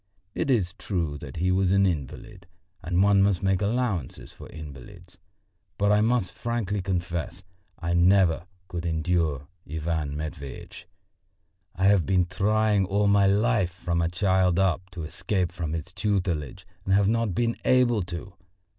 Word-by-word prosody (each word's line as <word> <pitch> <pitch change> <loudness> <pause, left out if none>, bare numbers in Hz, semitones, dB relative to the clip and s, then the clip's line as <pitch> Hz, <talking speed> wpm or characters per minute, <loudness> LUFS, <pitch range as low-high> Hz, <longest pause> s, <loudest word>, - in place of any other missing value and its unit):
It - - -2
is 100 -9 +1
true 80 -7 -2
that 70 -2 -9
he 90 +3 0
was 95 0 +2
an 100 0 +4
invalid 90 - -4 0.3
and 90 +3 +1
one 100 -1 +5
must 100 -2 +2
make 95 0 +1
allowances 105 - -2
for - - -12
invalids; 80 +4 -11 0.6
but 100 0 +2
I 105 0 +4
must 115 -3 +1
frankly 110 -4 -2
confess, 90 -1 -3 0.3
I 85 +1 -2
never 90 0 +3 0.2
could 85 -2 -5
endure 80 -4 -1 0.2
Ivan 80 -2 -2
Matveitch. 75 +3 -8 0.9
I 95 - 0
have 100 -4 +4
been 95 -2 +3
trying 105 +2 +1
all 100 +2 +1
my 100 -1 +4
life, 105 -1 +2
from 85 -1 -2
a 85 - +1
child 95 -1 +2
up, 95 0 +1
to 90 -2 -7
escape 90 +3 -2
from 80 -3 -4
his 85 +2 -5
tutelage 90 - -2 0.2
and 95 - +2
have 100 -1 +3
not 115 -4 0
been 115 -1 +1
able 120 -4 +3
to! 90 +1 -6
90 Hz, 155 wpm, -26 LUFS, 85-100 Hz, 0.9 s, one